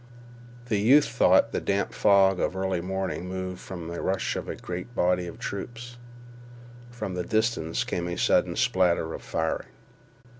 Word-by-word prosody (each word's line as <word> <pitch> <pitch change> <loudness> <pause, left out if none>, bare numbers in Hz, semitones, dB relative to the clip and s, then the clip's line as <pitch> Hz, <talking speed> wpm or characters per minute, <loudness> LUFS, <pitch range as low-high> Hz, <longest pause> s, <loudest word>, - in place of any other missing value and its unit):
The 110 -4 0
youth 135 +8 +6
thought 115 -2 +4
the - - -2
damp 100 -1 -1
fog 95 -2 +4
of - - 0
early 95 -2 -1
morning 95 0 -3
moved 95 -1 -4
from 85 -4 -7
the 85 0 -5
rush 95 0 -1
of - - -5
a - - -3
great 90 +7 -7
body 90 0 +1
of 85 - -8
troops. 120 +4 -6 0.9
From 110 -5 -5
the 90 0 -2
distance 110 -6 0
came 85 -1 -3
a 85 - -4
sudden - - +2
spatter 85 -3 +2
of - - -7
firing. - - -2
95 Hz, 160 wpm, -26 LUFS, 90-110 Hz, 0.9 s, youth